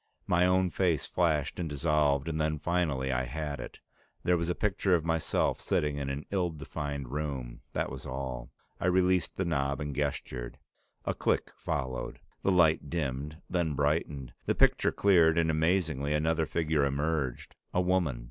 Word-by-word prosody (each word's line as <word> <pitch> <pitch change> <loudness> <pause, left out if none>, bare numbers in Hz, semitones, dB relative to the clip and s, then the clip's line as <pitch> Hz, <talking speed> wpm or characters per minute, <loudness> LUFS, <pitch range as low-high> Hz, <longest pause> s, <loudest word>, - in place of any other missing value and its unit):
My 90 +1 +3
own 90 0 +3
face 85 -6 +1
flashed 80 -5 0
and 85 -3 -2
dissolved 75 -1 +2
and 80 -1 -1
then, 75 0 0
finally, 75 -5 0
I 65 0 0
had 75 +2 -4
it. - - -8 0.5
There 90 - +3
was 85 0 -1
a 90 - 0
picture 100 -2 +2
of 80 -2 -1
myself 80 -1 +1
sitting 75 -1 0
in 70 -1 -2
an 70 +2 -4
ill 90 -3 +1
defined 75 -4 -5
room; 70 -5 -4
that - - -1
was - - -7
all. 65 -2 -4 0.3
I 85 - 0
released 90 0 +2
the 95 - 0
knob 70 -4 0
and 75 -2 -4
gestured. 65 -4 -3 0.5
A - - 0
click - - 0
followed. 65 -1 -3 0.2
The 95 - +2
light 85 -4 +4
dimmed, 75 0 -3
then 85 -5 0
brightened. 75 -2 -1
The - - +2
picture - - +4
cleared, 85 -5 +4
and 80 -1 +3
amazingly, 80 -3 +1
another 80 +1 +1
figure 80 -1 +1
emerged, 70 -2 -1 0.2
a - - +1
woman. 90 -8 +1
75 Hz, 165 wpm, -30 LUFS, 70-85 Hz, 0.5 s, light